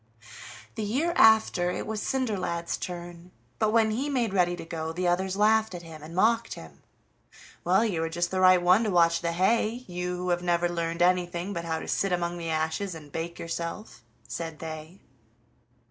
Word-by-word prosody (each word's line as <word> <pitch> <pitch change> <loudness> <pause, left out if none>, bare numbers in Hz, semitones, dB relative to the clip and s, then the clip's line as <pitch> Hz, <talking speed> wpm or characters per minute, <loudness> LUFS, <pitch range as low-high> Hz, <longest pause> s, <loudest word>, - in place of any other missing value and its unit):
The 220 - -5
year 275 +12 0
after, 220 -5 +5
it - - -3
was 215 -1 -3
Cinderlad's 200 -10 -1
turn, 175 0 -7 0.3
but 215 - +2
when 220 -1 +3
he 265 +7 -1
made 240 -7 0
ready 175 -2 +2
to 175 - -8
go 160 -1 -4
the 180 +2 -2
others 185 +2 0
laughed 215 -1 +3
at 175 - -8
him, 160 -2 -11
and 160 +3 -10
mocked 230 +4 +2
him. 80 -3 -13 0.8
"Well, 190 +6 +3
you 180 -7 -1
are 165 - -2
just 175 +1 -1
the 190 - -1
right 185 -1 +6
one 180 +5 +4
to - - 0
watch 170 -2 +3
the 170 -1 -1
hay, 220 +6 +1
you 180 0 -4
who 180 0 -3
have 175 0 +1
never 175 0 +1
learned 170 0 -1
anything 180 +1 +1
but 170 -2 -4
how 160 -1 -1
to - - -7
sit 195 - 0
among 175 0 -1
the 165 -1 -4
ashes 160 +4 -1
and 150 -3 -11
bake 170 +3 -5
yourself!" 170 - -5 0.3
said 165 -2 -5
they. 160 +3 -8
175 Hz, 190 wpm, -27 LUFS, 170-205 Hz, 0.8 s, right